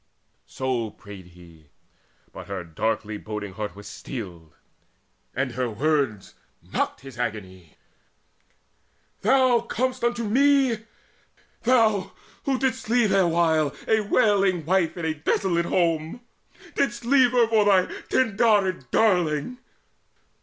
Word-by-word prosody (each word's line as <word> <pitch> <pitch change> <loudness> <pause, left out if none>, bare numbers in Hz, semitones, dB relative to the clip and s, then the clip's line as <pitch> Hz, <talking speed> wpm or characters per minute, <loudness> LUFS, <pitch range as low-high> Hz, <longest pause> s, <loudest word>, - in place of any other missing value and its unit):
So 125 -4 -2
prayed 100 -3 -13
he; 85 -3 -18 0.7
but - - -10
her 100 -2 -5
darkly 105 +5 -3
brooding 105 -2 -6
heart 105 0 -5
Was 100 0 -11
steeled, 90 - -8 0.8
and 130 - -1
her 125 0 -2
words 130 -4 -1 0.3
mocked - - -3
his 135 -3 -12
agony: 95 -8 -5 1.5
"Thou 260 -3 +4
comest 255 +2 -3
unto 240 0 0
me! 260 -1 +2 0.8
thou, 220 -6 +2 0.3
who 270 -2 +1
didst 260 -3 -2
leave 235 -3 +3
Erewhile 165 -5 +2
a 220 - +3
wailing 200 -5 +2
wife 180 0 +1
in 170 - -4
a 160 - 0
desolate 170 +3 0
home! 165 +3 0 0.5
Didst 240 -4 -1
leave 255 -1 +4
her 240 -2 +4
for 220 -2 +3
thy 190 -3 +4 0.2
Tyndarid 205 - +2
darling! 180 - +1
170 Hz, 115 wpm, -24 LUFS, -, 1.5 s, Thou